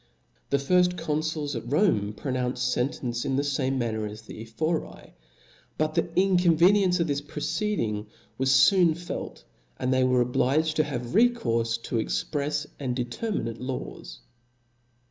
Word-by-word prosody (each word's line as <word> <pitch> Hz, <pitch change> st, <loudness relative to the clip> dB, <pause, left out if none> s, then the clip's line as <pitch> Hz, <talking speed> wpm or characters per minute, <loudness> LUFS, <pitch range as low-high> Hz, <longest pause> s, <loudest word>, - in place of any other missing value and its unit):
The. 140 Hz, -, +3 dB
firft 180 Hz, +5 st, +2 dB
confuls 155 Hz, -2 st, -2 dB
at 120 Hz, +1 st, -6 dB
Rome 115 Hz, -, +2 dB
pronounced 125 Hz, +1 st, -1 dB
fentence 125 Hz, -2 st, -2 dB
in 135 Hz, -2 st, -1 dB
the 140 Hz, -, +1 dB
fame 135 Hz, -2 st, 0 dB
manner 110 Hz, -3 st, -2 dB
as 105 Hz, +1 st, -9 dB
the 110 Hz, -, -10 dB
Ephori; 115 Hz, -, -4 dB, 0.6 s
but 155 Hz, 0 st, 0 dB
the 165 Hz, -, 0 dB
inconveniency 180 Hz, 0 st, +4 dB
of -, -, -4 dB
this 145 Hz, -1 st, -1 dB
proceeding 145 Hz, -, -2 dB, 0.3 s
was 135 Hz, 0 st, +5 dB
foon 180 Hz, -5 st, +4 dB
felt, 175 Hz, +1 st, -6 dB, 0.3 s
and 130 Hz, +1 st, 0 dB
they 130 Hz, 0 st, +3 dB
were 125 Hz, -1 st, +3 dB
obliged 140 Hz, +6 st, +1 dB
to 155 Hz, -, +4 dB
have 125 Hz, -3 st, -5 dB
recourfe 115 Hz, -, +2 dB
to 120 Hz, -, -2 dB
exprefa 145 Hz, +5 st, -1 dB
and 130 Hz, -3 st, -2 dB
determinate 120 Hz, -, -3 dB
laws. 125 Hz, -, -6 dB
135 Hz, 140 wpm, -26 LUFS, 120-160 Hz, 0.6 s, was